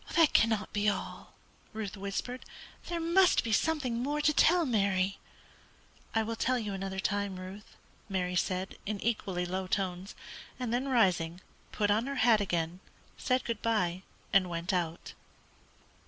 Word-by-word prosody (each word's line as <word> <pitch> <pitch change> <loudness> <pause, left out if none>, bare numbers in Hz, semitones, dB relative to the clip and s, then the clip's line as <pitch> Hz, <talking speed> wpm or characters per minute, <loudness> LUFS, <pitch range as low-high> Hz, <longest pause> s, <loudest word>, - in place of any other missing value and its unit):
"That 330 -4 +5
cannot 220 -2 +2
be 210 0 +2
all," 205 - -5 0.4
Ruth 215 -2 -4
whispered; 200 +6 -4 0.4
"there 345 -1 -2
must 345 +3 +4
be 230 - -3
something 260 -5 +1
more 290 +3 -1
to 305 +1 +3
tell, 340 +3 +5
Mary." 195 -5 +1 1.0
"I 225 - +3
will 225 +1 -3
tell 255 +3 +1
you 210 -4 -3
another 190 0 -4
time, 200 0 -1
Ruth," 190 +3 -10 0.3
Mary 180 -2 -1
said, 185 +1 -1
in 210 -1 -2
equally 195 -6 -1
low 185 +1 -3
tones, 185 0 -2 0.4
and 245 -2 -2
then 255 +3 0
rising, 180 -9 +2 0.3
put 205 -1 +1
on 220 +5 +2
her 280 - -3
hat 225 -3 +5
again, 175 -2 -1 0.4
said 255 0 +1
good 230 -2 -3
bye, 185 -6 0 0.3
and 190 -2 +4
went 170 +2 -2
out. 170 -1 -2
205 Hz, 155 wpm, -31 LUFS, 185-240 Hz, 1.0 s, That